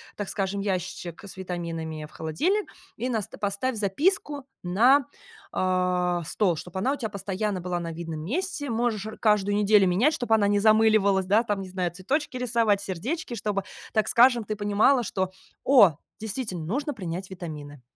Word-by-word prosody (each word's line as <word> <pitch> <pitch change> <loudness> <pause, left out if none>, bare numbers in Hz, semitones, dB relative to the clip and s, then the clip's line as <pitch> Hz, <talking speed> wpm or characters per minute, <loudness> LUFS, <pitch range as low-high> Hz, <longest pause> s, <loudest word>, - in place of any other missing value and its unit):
так 205 -2 -4
скажем, 195 0 -2
ящичек 185 -3 -4
с 200 - -8
витаминами 165 -4 -5
в - - -22
холодильник, 335 - -1 0.3
и 250 - -2
наста 220 -5 -3
поставь 205 +5 -1
записку 285 - 0 0.2
на, 240 +10 +4 0.4
а, 180 -1 +1
стол, 180 +1 +1
чтоб 180 +3 -7
она 250 +9 +1
у - - -4
тя 225 -5 -3
постоянно 200 0 -3
была 175 0 -2
на 165 -1 -4
видном 165 -1 -6
месте. 290 - -3
Можешь 225 -3 -1
р 220 - -8
каждую 205 -2 +2
неделю 210 -1 +5
менять, 220 - +3
чтоб 245 -7 -4
она 215 -2 +5
не 205 0 +2
замыливалась, 215 -3 +4
да, 205 +5 +3
там, 205 -4 -1
не 190 - -7
знаю, 180 -2 -2
цветочки 255 - -2
рисовать, 230 -4 +2
сердечки, 235 - -4
чтобы, 200 -2 -2 0.3
так 215 -1 +2
скажем, 240 -1 +5
ты 215 - -3
понимала, 210 +5 +3
что: 190 -3 -2 0.3
"О, 205 - +6 0.2
действительно, 210 -5 -4
нужно 280 - -2
принять 185 -4 -5
витамины". 150 -6 -8
205 Hz, 165 wpm, -26 LUFS, 180-235 Hz, 0.4 s, О